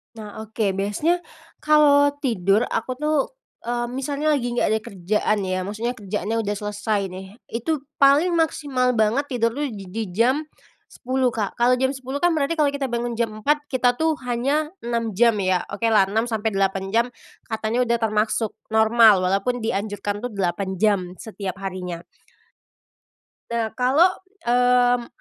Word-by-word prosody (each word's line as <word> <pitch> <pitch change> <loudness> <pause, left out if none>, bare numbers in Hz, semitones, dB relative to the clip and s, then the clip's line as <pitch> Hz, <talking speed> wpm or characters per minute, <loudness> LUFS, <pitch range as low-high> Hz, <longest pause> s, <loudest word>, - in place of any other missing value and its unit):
Nah, 215 -2 -9
oke. 220 -2 -1
Biasanya, 205 - 0 0.4
kalau 285 -2 +5
tidur 205 -3 +2
aku 230 +3 -2
tuh, 300 +3 0 0.5
eee, 240 0 -1
misalnya 280 +4 -1
lagi 270 -5 0
nggak - - +2
ada 220 - +1
kerjaan 210 +2 -1
ya, 185 0 -1
maksudnya 220 +4 -2
kerjaannya 205 +2 -3
udah 205 +1 -1
selesai 210 0 -2
nih, 190 +1 -8 0.2
itu 275 +6 -2 0.2
paling 285 +6 +5
maksimal 270 -6 +1
banget 225 +6 +2
tidur 230 -4 0
tuh 290 +5 -2
di 210 -6 -8
di 225 +3 -2
jam 260 +8 +2 0.4
10 260 0 -1
Kak. 210 0 -3
Kalau 245 +1 +4
jam 260 +1 +1
10 265 +2 -6
kan 350 - +5
berarti 315 0 0
kalau 300 -3 +2
kita 280 -1 -2
bangun 240 0 -2
jam 235 - +2 0.2
4, 295 +2 +1
kita 245 -2 +1
tuh 320 0 +2
hanya 275 +6 0
6 235 -1 -2
jam 230 +3 +3
ya. 185 -1 +2
Oke 225 +3 -1
lah, 200 -3 +5
6 220 +3 0
sampai 220 -1 -1
8 195 0 0
jam, 235 +1 +4 0.4
katanya 220 +2 -1
udah 235 -1 +1
termasuk 215 0 0 0.2
normal, 220 -2 +6
walaupun 195 +7 0
dianjurkan 205 -1 -3
tuh 245 - -3
8 190 -1 -2
jam 210 -2 +3 0.2
setiap 195 -4 -6
harinya. 185 -3 -5 1.5
Nah 230 -2 -1
kalau, 270 +8 +5 0.4
mmm, 245 0 +3
230 Hz, 155 wpm, -23 LUFS, 205-260 Hz, 1.5 s, normal